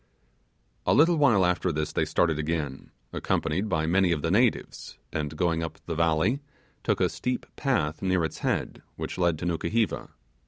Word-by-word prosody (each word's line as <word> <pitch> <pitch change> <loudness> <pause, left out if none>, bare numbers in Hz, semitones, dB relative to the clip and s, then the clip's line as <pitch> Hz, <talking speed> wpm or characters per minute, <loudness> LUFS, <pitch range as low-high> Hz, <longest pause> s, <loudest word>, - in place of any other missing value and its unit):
A - - +4
little 165 +3 +5
while 115 -11 +4
after 90 0 +1
this 75 -1 -2
they - - +1
started 80 -3 +1
again, 75 -3 -3 0.2
accompanied 90 +7 -1
by 80 -4 +1
many 90 +2 +3
of 75 -4 -1
the 80 - +1
natives, 115 +4 0 0.2
and 75 0 -3
going 85 -1 +1
up 80 -1 -5
the 85 - -3
valley, 85 - +2 0.4
took - - +1
a - - +4
steep 125 0 -3
path 105 - 0
near 95 -3 +1
its 80 - -6
head, - - -2
which - - -5
led 85 -3 +2
to - - -5
Nukuheva. 105 +6 -1
85 Hz, 170 wpm, -27 LUFS, 80-100 Hz, 0.4 s, little